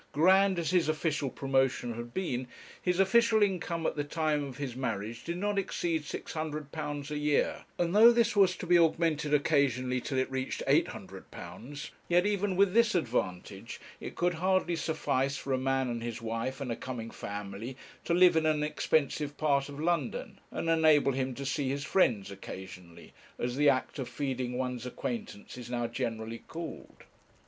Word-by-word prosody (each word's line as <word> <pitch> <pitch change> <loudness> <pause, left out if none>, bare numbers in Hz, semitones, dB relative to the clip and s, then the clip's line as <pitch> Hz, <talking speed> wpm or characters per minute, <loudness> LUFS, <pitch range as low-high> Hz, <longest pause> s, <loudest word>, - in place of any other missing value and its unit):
Grand 190 +5 +5
as 170 0 -1
his 175 -4 +3
official 155 -3 0
promotion 135 -3 0
had 120 +1 -7
been, 130 -7 -2 0.3
his 180 0 0
official 220 +2 +5
income 175 -4 -1
at - - 0
the 145 - -1
time 150 0 0
of 135 -2 -7
his 135 -5 -4
marriage 115 -2 -3
did 170 +1 -3
not 205 +1 0
exceed 170 -4 -1
£600 150 -1 -5
a 150 - -2
year, 150 -1 +1
and 175 +2 0
though 230 +3 +9
this 235 -2 +2
was 190 -2 +5
to - - -6
be 175 0 +5
augmented 160 -2 +2
occasionally 135 -4 +2
till 135 - -3
it 130 0 0
reached 130 0 -3
£800, 145 +5 -3 0.2
yet 175 +2 +4
even 205 -2 0
with 195 0 +4
this 230 -2 +4
advantage 95 - -2 0.2
it - - -7
could 175 0 +1
hardly 185 +1 +1
suffice 140 -4 0
for 135 - -3
a - - +2
man 135 0 +1
and 120 -1 -3
his 115 0 -4
wife 115 +4 -3
and 135 -4 -3
a - - -1
coming 115 -3 -6
family 105 +5 -6 0.3
to 170 - +1
live 180 -1 +6
in 160 -1 +3
an 150 -1 +2
expensive 150 -1 0
part 140 -2 +1
of 140 0 -8
London, 160 -5 -1
and - - -4
enable 155 -4 +5
him 130 -1 -2
to 140 - -5
'see 135 0 -1
his 140 +1 -2
friends' 110 - +2
occasionally, 95 -3 -10 0.2
as 120 0 -2
the 145 +1 +5
act 130 +2 0
of 130 - -3
feeding 130 -3 -3
one's 125 -1 -3
acquaintance 170 - -5
is 120 - -8
now 120 -1 -1
generally 115 -1 -3
called. 165 0 -8
145 Hz, 175 wpm, -30 LUFS, 125-170 Hz, 0.3 s, though